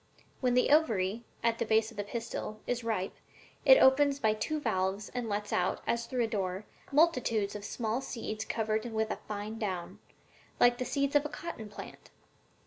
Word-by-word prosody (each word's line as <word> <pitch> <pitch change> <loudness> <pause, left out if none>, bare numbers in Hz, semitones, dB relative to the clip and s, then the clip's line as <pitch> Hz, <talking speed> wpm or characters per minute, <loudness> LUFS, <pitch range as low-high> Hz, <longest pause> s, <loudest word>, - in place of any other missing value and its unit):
When 250 -2 +2
the 250 - +3
ovary, 225 -8 +2 0.2
at 230 0 +1
the - - 0
base 220 +1 +3
of 225 - -15
the 205 - -1
pistil, 220 0 -5
is 245 -1 -2
ripe, 215 -5 -1 0.5
it - - +9
opens 275 - +5
by 220 -5 +2
two 305 +8 -2
valves 195 -4 -1
and 245 -2 -4
lets 210 0 -2
out, 180 - 0
as 235 0 -1
through 250 -2 0
a - - +1
door, 195 -2 -2 0.3
multitudes 255 -10 +2
of 205 - -6
small 225 +3 -2
seeds 225 -4 -4
covered 220 -1 -1
with 220 -2 -1
a - - -3
fine 210 +2 -5
down, 185 -5 -4 0.6
like 245 0 +5
the 255 - -1
seeds 280 +1 0
of 290 - +7
the 300 - -5
cotton 300 -8 -7
plant. 205 - -10
225 Hz, 185 wpm, -31 LUFS, 210-250 Hz, 0.6 s, it